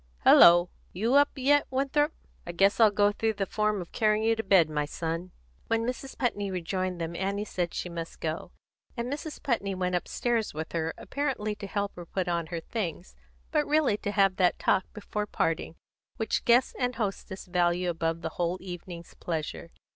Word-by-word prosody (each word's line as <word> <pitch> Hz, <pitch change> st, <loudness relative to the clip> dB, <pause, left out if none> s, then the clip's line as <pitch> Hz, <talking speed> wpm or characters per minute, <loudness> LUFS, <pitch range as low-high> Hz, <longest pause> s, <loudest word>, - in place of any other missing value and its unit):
Hello! 175 Hz, +1 st, +8 dB, 0.2 s
you 225 Hz, +7 st, 0 dB
up 285 Hz, +1 st, +6 dB
yet, 285 Hz, +2 st, +3 dB
Winthrop? 280 Hz, +3 st, +1 dB, 0.4 s
I 175 Hz, -, -4 dB
guess 195 Hz, +5 st, +3 dB
I'll 220 Hz, -2 st, +8 dB
go 205 Hz, 0 st, +3 dB
through 220 Hz, +1 st, 0 dB
the 200 Hz, -1 st, -1 dB
form 210 Hz, 0 st, 0 dB
of 175 Hz, -, -10 dB
carrying 215 Hz, 0 st, +2 dB
you 225 Hz, 0 st, +3 dB
to 225 Hz, -, -2 dB
bed, 190 Hz, -6 st, +5 dB
my 150 Hz, -1 st, -1 dB
son." 165 Hz, +4 st, -4 dB, 0.4 s
When 225 Hz, 0 st, +1 dB
Mrs. 255 Hz, +2 st, -5 dB
Putney 205 Hz, -6 st, -1 dB
rejoined 185 Hz, 0 st, -2 dB
them, 165 Hz, 0 st, -4 dB
Annie 200 Hz, +3 st, -2 dB
said 175 Hz, -4 st, -3 dB
she -, -, -3 dB
must 170 Hz, -1 st, -7 dB
go, 160 Hz, +1 st, -4 dB, 0.5 s
and 240 Hz, +3 st, -2 dB
Mrs. 300 Hz, +1 st, -7 dB
Putney 200 Hz, -7 st, 0 dB
went 180 Hz, -1 st, -1 dB
upstairs 225 Hz, +3 st, -1 dB
with 160 Hz, +1 st, -5 dB
her, 165 Hz, -1 st, -2 dB
apparently 260 Hz, -7 st, -2 dB
to 205 Hz, -1 st, -7 dB
help 200 Hz, 0 st, -2 dB
her 175 Hz, -1 st, -8 dB
put 185 Hz, 0 st, -2 dB
on 170 Hz, -2 st, -1 dB
her 170 Hz, 0 st, -4 dB
things, 180 Hz, -3 st, -5 dB, 0.4 s
but 300 Hz, -2 st, +1 dB
really 300 Hz, -7 st, +3 dB
to 205 Hz, -, -4 dB
have 195 Hz, -2 st, +3 dB
that 180 Hz, -2 st, +3 dB
talk 190 Hz, -, +1 dB
before 210 Hz, 0 st, -4 dB
parting 165 Hz, -3 st, -1 dB, 0.4 s
which 220 Hz, -1 st, -1 dB
guest 245 Hz, +2 st, +4 dB
and 250 Hz, 0 st, 0 dB
hostess 195 Hz, -3 st, -4 dB
value 180 Hz, 0 st, +1 dB
above 165 Hz, -1 st, -1 dB
the -, -, -1 dB
whole 175 Hz, +1 st, 0 dB
evening's 175 Hz, -2 st, -8 dB
pleasure. 165 Hz, 0 st, -4 dB
195 Hz, 185 wpm, -28 LUFS, 175-225 Hz, 0.5 s, Hello